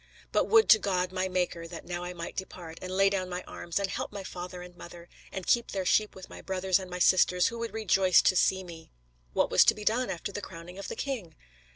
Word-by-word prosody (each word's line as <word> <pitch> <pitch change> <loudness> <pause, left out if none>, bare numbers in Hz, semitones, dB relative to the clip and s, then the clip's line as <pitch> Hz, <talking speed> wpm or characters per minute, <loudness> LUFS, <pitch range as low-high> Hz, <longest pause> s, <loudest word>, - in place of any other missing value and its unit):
But - - +2
would 445 0 +6
to 220 - +9
God, 185 -2 -1
my 185 0 -1
Maker, 180 -2 -2
that 165 0 -9
now 175 0 -4
I 175 - -5
might 170 -1 -7
depart, 170 -3 -7
and 185 - -6
lay 195 +1 +4
down 190 -2 -1
my 180 0 -4
arms, 170 -1 -5
and 200 -1 +1
help 200 - -4
my 200 -1 -6
father 180 0 -7
and 180 0 -13
mother, 175 0 -11 0.2
and 190 -2 -5
keep 235 -1 +2
their 190 -2 -3
sheep 215 +3 +2
with 190 - -10
my - - -11
brothers 190 0 0
and 185 -1 -8
my 180 - -5
sisters, 180 0 +4
who 235 - -7
would 230 0 -3
rejoice 195 -3 +4
to 185 - +3
see 190 +1 +2
me!" 165 -2 -12 0.4
What - - +1
was - - +7
to - - +5
be 210 - -8
done 245 +4 +1
after 175 +3 -4
the 205 - -5
crowning 180 0 -10
of 200 - -6
the - - -5
king? 220 - -4
185 Hz, 250 wpm, -29 LUFS, 175-195 Hz, 0.4 s, to